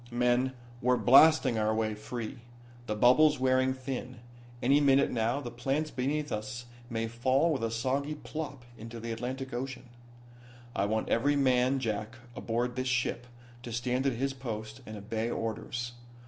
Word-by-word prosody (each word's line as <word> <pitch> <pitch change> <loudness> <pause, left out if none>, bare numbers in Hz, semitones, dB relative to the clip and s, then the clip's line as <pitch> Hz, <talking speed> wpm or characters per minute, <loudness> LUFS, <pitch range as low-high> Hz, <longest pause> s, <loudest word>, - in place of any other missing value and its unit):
"Men, 125 +2 +2 0.3
we're 125 +1 +3
blasting 135 -2 +6
our 110 0 +1
way 110 -1 0
free. 115 +3 -6 0.5
The 105 - -1
bubble's 145 +7 +5
wearing 130 0 +3
thin. 130 -1 -5 0.4
Any 140 +4 +4
minute 140 -1 +4
now 120 +4 0
the 120 -3 -6
plants 135 +6 -1
beneath 145 +3 -1
us 120 +3 -4 0.2
may 115 -1 -2
fall 130 +8 +2
with 130 - -2
a 115 - +1
soggy 135 +6 -1
plop 145 -4 -6
into 115 +1 -8
the 115 +1 -5
Atlantic 130 +3 -4
Ocean. 125 0 -5 0.9
"I 100 - +1
want 110 +2 -1
every 145 +6 +2
man 130 -1 +3
jack 110 -2 -3 0.2
aboard 120 +2 -2
this 130 0 -1
ship 120 -1 0 0.3
to 120 - -7
stand 125 +3 0
at 135 - +2
his 135 +3 -1
post 110 -2 -6
and 110 0 -7
obey 110 +3 -3
orders. 120 +2 -3
125 Hz, 160 wpm, -30 LUFS, 115-135 Hz, 0.9 s, blasting